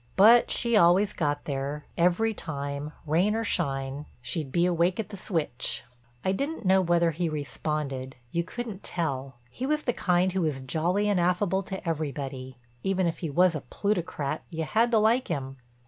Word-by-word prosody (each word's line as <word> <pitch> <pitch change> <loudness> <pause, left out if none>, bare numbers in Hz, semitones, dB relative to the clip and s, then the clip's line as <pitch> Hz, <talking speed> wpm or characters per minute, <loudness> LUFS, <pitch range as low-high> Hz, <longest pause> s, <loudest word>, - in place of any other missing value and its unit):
But 225 +5 +7
she 235 -1 +1
always 195 +2 +5
got 145 -2 -1
there; 140 +1 -3
every 180 +6 +2
time, 145 -4 -5
rain 175 +8 +2
or 225 - 0
shine, 135 -5 -2
she'd 135 +3 -4
be 170 +4 +3
awake 175 +2 +2
at 215 -2 -3
the 205 - -7
switch. 165 - -2 0.4
I 190 - +3
didn't 280 +4 -3
know 190 +1 +5
whether 170 -1 +3
he 165 +2 -1
responded—you 140 -2 -3
couldn't 220 +1 -6
tell. 135 -6 -3 0.2
He 260 - -4
was 300 +1 +1
the 245 - 0
kind 180 -2 +2
who 190 0 0
was 150 -5 -1
jolly 175 +9 +1
and 205 -3 +2
affable 180 +2 +2
to 190 -1 -7
everybody; 135 -5 -3 0.2
even 190 +2 +1
if 170 - -1
he 165 - -3
was 180 +4 +4
a 155 - -3
plutocrat 165 -2 -2
you 165 -2 -3
had 225 +9 +2
to 230 - +3
like 225 +4 +3
him. 135 -4 -3
170 Hz, 175 wpm, -27 LUFS, 145-195 Hz, 0.4 s, But